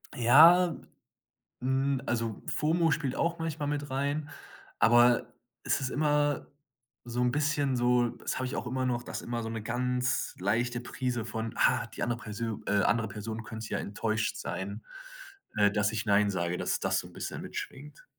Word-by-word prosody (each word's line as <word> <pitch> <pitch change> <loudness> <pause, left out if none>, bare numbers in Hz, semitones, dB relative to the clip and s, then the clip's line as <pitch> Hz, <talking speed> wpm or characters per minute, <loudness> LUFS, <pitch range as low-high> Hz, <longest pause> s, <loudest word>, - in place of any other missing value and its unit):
Ja, 165 +9 +7 0.9
hm, 135 +1 +1
also, 115 -3 -2
Fomo 165 +2 +1
spielt 140 -3 -1
auch 170 0 0
manchmal 155 -3 -3
mit 145 -1 -2
rein, 145 +3 -1 0.5
aber 120 +1 +5 0.3
es - - +1
ist 130 - -1
immer 145 -1 +1 0.6
so 120 +1 -2
'n 125 0 +2
bisschen 145 -2 +1
so 120 0 +3
das - - -5
habe 130 - -2
ich 130 - -4
auch - - -3
immer 130 +1 -1
noch, 120 -1 -1
dass - - -5
immer 120 -1 -3
so 110 - -4
'ne 115 -1 -4
ganz 125 +2 -1
leichte 120 +6 0
Prise 125 -2 -3
von: 110 0 -4
„Ah, 120 -2 +3
die 110 - -5
andere 120 0 -1
Persö 110 0 -4
äh 100 -1 +2
andere 115 -2 +2
Person 110 +2 -6
könnte 110 0 -7
ja - - -1
enttäuscht 110 +1 -2
sein, 100 +3 -5 0.7
äh, 105 -1 +5
dass 105 +1 +1
ich 110 -1 -3
nein 100 0 +4
sage.“ 85 -1 -1
Dass - - -1
das - - +1
so - - -7
'n - - -17
bisschen - - -5
mitschwingt. 145 +2 -8
120 Hz, 175 wpm, -29 LUFS, 110-140 Hz, 0.9 s, Ja